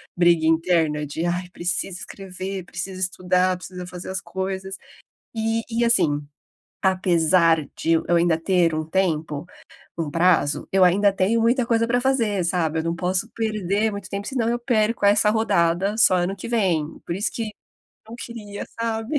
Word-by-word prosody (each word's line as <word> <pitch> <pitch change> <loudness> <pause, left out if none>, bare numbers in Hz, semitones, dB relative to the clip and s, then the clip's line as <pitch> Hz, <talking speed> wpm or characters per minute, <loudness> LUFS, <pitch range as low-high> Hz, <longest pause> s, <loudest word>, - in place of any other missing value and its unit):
briga 170 -2 +3
interna 160 -2 +2
de: 155 +4 -4
"Ai, 175 +1 -2
precisa 175 +1 -2
escrever, 190 0 -6
precisa 185 +1 -6
estudar, 185 0 +1
precisa 180 0 -8
fazer 180 +1 -8
as 190 +1 -3
coisas". 190 0 -4 0.6
Eh, 225 +1 0
e, 235 +1 0
assim, 155 -11 +2 0.6
apesar 170 -4 +3
de 165 - 0
eu 165 - +2
eu 175 - +3
ainda 170 -1 +3
ter 170 -1 +2
um 155 0 -2
tempo, 160 -3 -1 0.5
um 160 -3 -2
prazo, 165 -3 +2
eu 190 -1 +4
ainda 200 +3 +4
tenho 195 +4 +1
muita 235 +2 +2
coisa 230 -1 +2
pra 245 +1 +2
fazer, 230 -8 +1
sabe. 165 -2 0
Eu - - -2
não 165 +1 -1
posso 185 +4 -1
perder 215 -1 -1
muito 200 -2 -7
tempo, 200 +1 -4
senão 245 -4 -1
eu 240 +1 0
perco 230 -3 +1
essa 210 +1 +5
rodada, 195 -2 +1
só 190 -4 +5
ano 180 +2 -1
que 190 - -8
vem. 190 -10 +1 0.2
Por 170 - -3
isso 205 +4 -1
que 225 -2 -3 0.6
não 230 - -9
queria, 215 -4 -7
sabe. 230 +5 -1
185 Hz, 170 wpm, -23 LUFS, 170-215 Hz, 0.6 s, essa